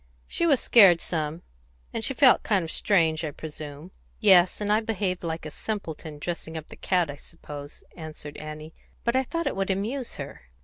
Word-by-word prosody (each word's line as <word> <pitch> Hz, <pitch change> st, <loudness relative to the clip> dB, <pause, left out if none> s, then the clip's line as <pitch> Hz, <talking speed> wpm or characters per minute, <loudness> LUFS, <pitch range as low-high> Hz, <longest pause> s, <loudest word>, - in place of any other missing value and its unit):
"She 340 Hz, -, 0 dB
was 280 Hz, -6 st, +4 dB
scared 195 Hz, -7 st, +7 dB
some, 160 Hz, -1 st, -3 dB, 0.5 s
and 225 Hz, -, -3 dB
she 270 Hz, -, 0 dB
felt 260 Hz, -2 st, +6 dB
kind 200 Hz, -5 st, +1 dB
of 160 Hz, -, -6 dB
strange, 165 Hz, -5 st, +2 dB
I 155 Hz, -, -1 dB
presume." 150 Hz, +2 st, -8 dB, 0.3 s
"Yes, 185 Hz, -4 st, +6 dB
and 210 Hz, 0 st, +1 dB
I 215 Hz, -, +4 dB
behaved 205 Hz, -5 st, -2 dB
like 160 Hz, -1 st, -4 dB
a 155 Hz, -, -6 dB
simpleton, 160 Hz, -6 st, -5 dB
dressing 160 Hz, +1 st, -5 dB
up 155 Hz, -, -8 dB
the -, -, -10 dB
cat, 180 Hz, -5 st, +1 dB
I -, -, -8 dB
suppose," 145 Hz, 0 st, -10 dB
answered 155 Hz, -3 st, -8 dB
Annie. 155 Hz, +1 st, -8 dB, 0.3 s
"But 235 Hz, +1 st, +1 dB
I 260 Hz, -, +4 dB
thought 335 Hz, +6 st, -3 dB
it 280 Hz, -, -1 dB
would 195 Hz, 0 st, -1 dB
amuse 225 Hz, +7 st, -2 dB
her." -, -, -8 dB
175 Hz, 190 wpm, -26 LUFS, 155-215 Hz, 0.5 s, scared